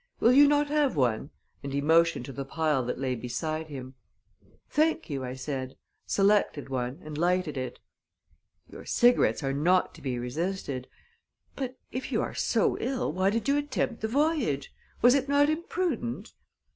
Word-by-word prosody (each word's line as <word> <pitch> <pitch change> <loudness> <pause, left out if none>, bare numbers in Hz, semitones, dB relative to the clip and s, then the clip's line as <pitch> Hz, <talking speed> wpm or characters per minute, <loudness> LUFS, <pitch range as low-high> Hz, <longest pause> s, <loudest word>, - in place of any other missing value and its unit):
Will 235 - +5
you 285 +2 +8
not 290 0 +3
have 295 - +2
one?" 125 -1 +1 0.3
and 140 - -5
he 140 - 0
motioned 165 -2 +3
to 135 - -8
the 140 - -4
pile 150 -1 0
that 125 - -3
lay 130 -1 -1
beside 155 +7 -3
him. 130 -3 -8 0.7
"Thank 315 - +1
you," 135 -2 -3
I 125 0 -5
said, 130 -1 -5 0.3
selected 195 -8 +2
one, 130 +2 -3
and 155 -1 -7
lighted 180 -2 +1
it. 130 -1 -4 0.9
"Your - - -11
cigarettes 240 - +3
are 135 0 0
not 175 +6 +2
to - - -14
be 130 -3 -2
resisted. 135 +1 -3 0.7
But 260 -2 -4
if 255 - -5
you - - +1
are - - -4
so - - +1
ill, 255 - -1
why 185 +2 +2
did 230 +5 -1
you 280 +1 +3
attempt 290 -4 -2
the 220 - 0
voyage? 270 - 0 0.3
Was 245 +1 +8
it 275 0 +1
not 285 +1 +4
imprudent?" 310 - -3
165 Hz, 170 wpm, -28 LUFS, -, 0.9 s, you